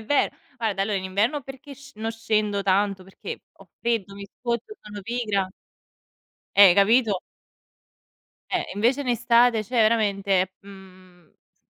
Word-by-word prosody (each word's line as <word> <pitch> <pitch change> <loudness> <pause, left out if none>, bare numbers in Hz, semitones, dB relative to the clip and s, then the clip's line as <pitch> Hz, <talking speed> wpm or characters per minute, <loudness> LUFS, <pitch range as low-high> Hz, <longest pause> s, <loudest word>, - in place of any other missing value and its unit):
è 220 - -11
ver 285 +5 +2 0.3
Guarda, 210 -4 -1
allora, 200 0 -1
in 190 - -7
inverno 220 +10 0
perché 270 +2 -11
sc 270 -4 -16
non 225 +1 -3
scendo 215 -3 0
tanto 195 0 +1
perché 190 - -8
ho - - -19
freddo, 220 -5 -1
mi 200 0 -9
scoccio, 240 - -4
sono 210 -1 -9
pigra. 210 -4 -1 1.1
Eh, 195 -3 +8
capito? 210 -1 +3 1.3
Eh, - - -1
invece, 245 +7 +1
in - - -9
estate 240 -1 +3
cioè 245 +4 -6
veramente, 200 -4 +2
mhmm, 185 -3 -16
s - - -45
210 Hz, 145 wpm, -24 LUFS, 195-235 Hz, 1.3 s, Eh